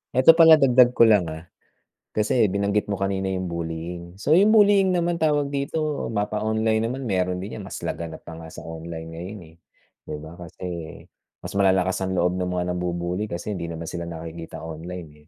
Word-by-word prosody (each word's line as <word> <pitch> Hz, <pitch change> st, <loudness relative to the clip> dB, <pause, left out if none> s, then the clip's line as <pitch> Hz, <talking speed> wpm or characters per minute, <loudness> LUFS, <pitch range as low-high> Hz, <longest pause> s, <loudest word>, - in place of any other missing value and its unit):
'Eto 130 Hz, +5 st, +8 dB
pala 160 Hz, -1 st, +10 dB
dagdag 125 Hz, -3 st, +5 dB
ko -, -, +6 dB
lang, 105 Hz, -6 st, +5 dB
ah, 80 Hz, +1 st, -7 dB, 0.7 s
kasi 110 Hz, +1 st, +3 dB
binanggit 100 Hz, +2 st, 0 dB
mo 100 Hz, -, -1 dB
kanina 95 Hz, 0 st, -1 dB
yung 95 Hz, -2 st, -2 dB
bullying. 85 Hz, +1 st, -5 dB
So, 105 Hz, +10 st, -2 dB
yung 205 Hz, +6 st, +6 dB
bullying 200 Hz, -3 st, +5 dB
naman 170 Hz, 0 st, 0 dB
tawag 150 Hz, -3 st, +1 dB
dito, 145 Hz, +1 st, -2 dB
mapa-online 110 Hz, +1 st, 0 dB
naman 130 Hz, +3 st, -4 dB
meron 90 Hz, -4 st, -1 dB
din 105 Hz, +2 st, -7 dB
'yan, -, -, -7 dB
mas -, -, -6 dB
laganap 85 Hz, -1 st, -5 dB
pa 80 Hz, -1 st, -9 dB
nga 80 Hz, -, -9 dB
sa 80 Hz, -, -10 dB
online 80 Hz, 0 st, -7 dB
ngayon, 95 Hz, +6 st, -7 dB
eh, 80 Hz, -, -22 dB, 0.5 s
'di -, -, -4 dB
ba. 85 Hz, +3 st, -11 dB
Kasi 85 Hz, +1 st, -11 dB, 0.8 s
mas -, -, -6 dB
malalakas 95 Hz, -1 st, +2 dB
ang 95 Hz, 0 st, -2 dB
loob 90 Hz, 0 st, +1 dB
ng 90 Hz, -, -1 dB
mga 90 Hz, -, 0 dB
nambu-bully 90 Hz, +3 st, -2 dB
kasi 90 Hz, +4 st, -5 dB
hindi 85 Hz, -2 st, -4 dB
naman 85 Hz, 0 st, -6 dB
sila 85 Hz, 0 st, -5 dB
nakikita 80 Hz, 0 st, -8 dB
online, 80 Hz, -2 st, -8 dB
95 Hz, 185 wpm, -24 LUFS, 85-115 Hz, 0.8 s, pala